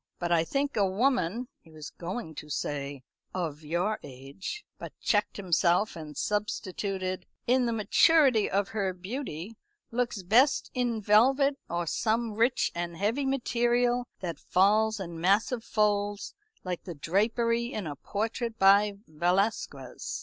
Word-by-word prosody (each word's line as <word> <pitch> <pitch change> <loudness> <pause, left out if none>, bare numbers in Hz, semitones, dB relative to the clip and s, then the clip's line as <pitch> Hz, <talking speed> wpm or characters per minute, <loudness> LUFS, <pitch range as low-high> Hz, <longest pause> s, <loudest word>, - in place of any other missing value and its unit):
But 175 -1 -3
I 165 -1 +4
think 275 +10 -1
a 210 - +3
woman" 240 +1 +1
he 165 - -21
was 155 -2 -9
going 175 0 -6
to 150 0 -9
say 140 -2 -3 0.3
"of 160 -5 -3
your 175 +8 -1
age," 140 - -8
but - - -9
checked 205 -1 +1
himself 180 +1 +2
and 155 -3 -8
substituted 190 -2 -2 0.2
"in 250 0 +3
the - - 0
maturity 230 +3 +4
of 200 0 0
her 195 -4 -1
beauty 195 - -6 0.3
looks 235 -4 -1
best 245 +10 +3
in 240 -4 -1
velvet, 270 +7 +4
or 175 0 -1
some 225 +6 0
rich 235 +4 +2
and 170 -1 -4
heavy 230 +9 0
material 245 -1 +1
that 170 -5 -4
falls 215 +3 +3
in 170 -3 -6
massive 215 +6 +2
folds, 205 -2 0 0.3
like 180 -2 -3
the 175 -4 -6
drapery 230 - +1
in 215 -8 -4
a 145 -2 -4
portrait 225 - -3
by 200 +2 +5
Velasquez. 170 - -1
205 Hz, 140 wpm, -28 LUFS, 175-235 Hz, 0.3 s, by